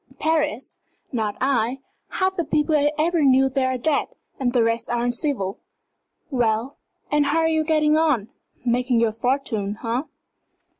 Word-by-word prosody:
"Paris? 310 -4 -1 0.3
Not 220 -5 -2
I! 255 -2 +1 0.4
Half 380 0 0
the 345 - 0
people 305 0 0
I 295 0 +3
ever 330 +2 +1
knew 270 -1 +4
there 265 0 0
are 260 - -1
dead, 290 +4 +1 0.3
and 255 -2 +1
the 245 -2 +3
rest 230 +1 0
are 240 0 0
uncivil. 245 -5 -1 0.7
Well, 240 +1 0 0.3
and 295 -1 +3
how 295 +3 +1
are 320 - +2
you 315 -1 +1
getting 305 -1 +2
on? 300 -10 +1 0.4
Making 245 0 +2
your 230 -1 +2
fortune, 225 -4 -1
eh?" 235 +3 0
265 Hz, 155 wpm, -23 LUFS, 235-300 Hz, 0.7 s, knew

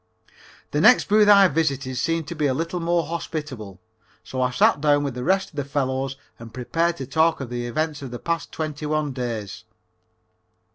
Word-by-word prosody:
The 150 - +1
next 245 +7 +6
booth 210 0 +5
I 200 -1 +8
visited 140 -5 -1
seemed 165 +4 -1
to - - -4
be 150 -2 +1
a 130 - 0
little 165 +4 -2
more 170 0 +1
hospitable, 145 - -6 0.4
so 130 - -4
I 125 - +2
sat 130 +3 +3
down 145 -1 +3
with 140 -2 -2
the 125 0 -5
rest 195 +6 +1
of 150 - -17
the 145 - 0
fellows 135 -1 -2 0.2
and 115 -1 -10
prepared 165 +8 -1
to 135 - -5
talk 160 +5 +2
of 130 -3 -6
the 120 0 -3
events 155 +3 -2
of 135 - -6
the 120 - -6
past 165 +3 -3
twenty 155 -1 -4
one 155 -1 -1
days. 115 -6 -5
145 Hz, 195 wpm, -23 LUFS, 130-165 Hz, 0.4 s, I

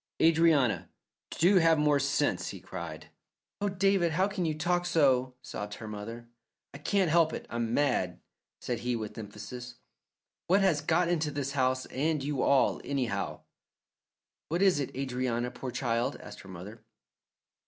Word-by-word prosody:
"Adrianna, 160 -7 +4 0.4
do 185 +4 +4
have 165 -2 +5
more 150 -1 +3
sense!" 140 +1 0
he - - -6
cried. - - -8 0.5
"Oh, 205 - +1
David, 195 -3 +2
how 185 +4 +3
can 195 -3 -2
you 155 -1 -1
talk 175 +2 0
so?" 130 -6 +3
sobbed 105 0 -6
her 110 - -8
mother. 115 +3 -7 0.5
"I 140 - -9
can't 185 +2 +1
help 165 -1 +4
it. - - -5
I'm 115 0 -1
mad!" 125 -11 +1 0.4
said 120 -3 -3
he 120 +1 -1
with 110 -2 -5
emphasis. 110 +3 -8 0.7
"What 190 +3 +4
has 175 -7 +3
got 170 +3 +2
into 160 -3 +1
this 140 -1 -3
house 130 -2 +1
and 150 +1 -1
you 145 -1 -1
all, 140 -2 +3
anyhow?" 135 -4 -2 1.1
"What 170 +5 +1
is 190 -6 +4
it, 140 - -2
Adrianna, 125 -2 -1
poor 130 +1 -6
child," 120 -1 -1
asked - - -10
her 95 - -12
mother. 100 +5 -9
140 Hz, 155 wpm, -30 LUFS, 120-165 Hz, 1.1 s, have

